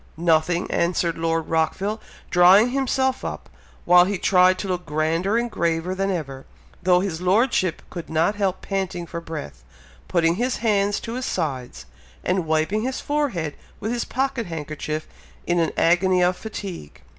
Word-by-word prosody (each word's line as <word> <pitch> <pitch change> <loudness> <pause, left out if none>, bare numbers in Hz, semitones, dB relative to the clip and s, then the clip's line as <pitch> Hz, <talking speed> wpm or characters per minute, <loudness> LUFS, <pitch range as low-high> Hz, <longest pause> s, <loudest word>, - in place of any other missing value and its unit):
"Nothing!" 170 +1 +2
answered 170 -1 +1
Lord 165 -1 -1
Rockville, 190 +7 -1 0.3
drawing 190 +7 +6
himself 265 0 0
up, - - -6 0.3
while 180 0 +7
he 200 +1 -1
tried 185 0 +4
to 195 - -4
look 180 -1 -2
grander 165 +6 0
and 235 0 -1
graver 170 +1 -1
than 195 +1 -1
ever, 135 -8 -4 0.3
though 180 0 +4
his 180 -4 -3
Lordship 185 -1 +2
could 170 - -7
not 160 +5 +2
help 195 -3 -1
panting 190 -3 -3
for 170 0 -6
breath 150 - -7 0.4
putting 170 0 +2
his 250 +3 0
hands 205 -2 +1
to 230 - -6
his 255 +1 -3
sides 130 - -3 0.4
and 180 -2 0
wiping 160 +7 +1
his 255 +3 -2
forehead 255 - -1 0.3
with 220 - -3
his 240 -1 -1
pocket 260 -3 -2
handkerchief 155 -1 -5 0.4
in 175 0 +1
an 165 -2 +1
agony 180 +2 +3
of 180 +1 +2
fatigue. 195 - -8
180 Hz, 155 wpm, -23 LUFS, 165-205 Hz, 0.4 s, while